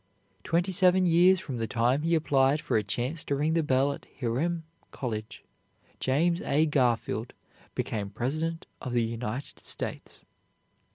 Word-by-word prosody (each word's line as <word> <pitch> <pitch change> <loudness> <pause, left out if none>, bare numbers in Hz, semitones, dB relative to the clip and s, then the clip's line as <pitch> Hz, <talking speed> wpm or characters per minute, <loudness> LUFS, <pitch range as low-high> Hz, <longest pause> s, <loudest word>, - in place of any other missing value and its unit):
Twenty 175 +3 +1
seven 185 0 +4
years 180 +2 +5
from 135 -8 -5
the 115 -1 -1
time 120 +5 +1
he 165 +2 +2
applied 140 -2 +3
for - - -2
a 110 - +4
chance 130 +9 -2
to 140 - 0
ring 150 +3 +1
the 165 - +3
bell 140 -1 +2
at - - -12
Hiram 150 +8 -1 0.3
College, 110 -5 -5 0.6
James 170 +6 +2
A. 150 +3 +2
Garfield 120 -5 0 0.4
became 100 -3 -2
President 155 +10 -2 0.2
of 125 - -4
the 120 -1 +3
United 115 +3 -4
States. - - -6
140 Hz, 150 wpm, -28 LUFS, 120-165 Hz, 0.6 s, years